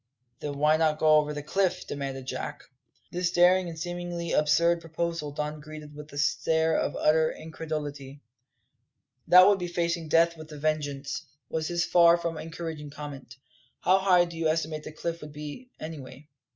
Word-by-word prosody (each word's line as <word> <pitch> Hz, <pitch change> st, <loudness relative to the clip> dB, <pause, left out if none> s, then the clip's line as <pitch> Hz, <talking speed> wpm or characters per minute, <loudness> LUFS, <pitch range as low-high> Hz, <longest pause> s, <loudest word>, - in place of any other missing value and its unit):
"Then 145 Hz, -1 st, -5 dB
why 150 Hz, +2 st, +4 dB
not 155 Hz, -1 st, +2 dB
go 155 Hz, 0 st, +5 dB
over 150 Hz, 0 st, +1 dB
the 150 Hz, -1 st, -5 dB
cliff?" 185 Hz, +3 st, 0 dB
demanded 135 Hz, -2 st, -5 dB
Jack. -, -, -5 dB, 0.5 s
This 180 Hz, 0 st, 0 dB
daring 180 Hz, +1 st, +4 dB
and 165 Hz, -, -8 dB
seemingly 175 Hz, 0 st, -4 dB
absurd 170 Hz, +3 st, +3 dB
proposal 165 Hz, -1 st, -3 dB
Don 150 Hz, +1 st, -4 dB
greeted 150 Hz, -1 st, -10 dB
with 150 Hz, +1 st, -10 dB
a 145 Hz, -, -9 dB
stare 160 Hz, +3 st, +2 dB
of -, -, 0 dB
utter 155 Hz, +1 st, +3 dB
incredulity. 150 Hz, -3 st, -6 dB, 1.1 s
"That 180 Hz, +1 st, +9 dB
would 200 Hz, -1 st, +4 dB
be 175 Hz, -, -3 dB
facing 170 Hz, -1 st, -1 dB
death 170 Hz, +2 st, +4 dB
with 155 Hz, 0 st, -11 dB
a -, -, -8 dB
vengeance," 145 Hz, -1 st, -2 dB, 0.2 s
was 160 Hz, -1 st, -2 dB
his 170 Hz, 0 st, 0 dB
far 170 Hz, -1 st, +6 dB
from 170 Hz, -2 st, -3 dB
encouraging 160 Hz, -2 st, -6 dB
comment. 140 Hz, -3 st, -9 dB, 0.4 s
"How 190 Hz, +1 st, +4 dB
high 180 Hz, -2 st, +5 dB
do 170 Hz, -1 st, -9 dB
you 165 Hz, -1 st, 0 dB
estimate 155 Hz, -1 st, -1 dB
the -, -, -6 dB
cliff 170 Hz, +2 st, -4 dB
to 150 Hz, -, -8 dB
be, 150 Hz, -, -8 dB
anyway?" 145 Hz, -3 st, -9 dB
155 Hz, 170 wpm, -28 LUFS, 150-170 Hz, 1.1 s, That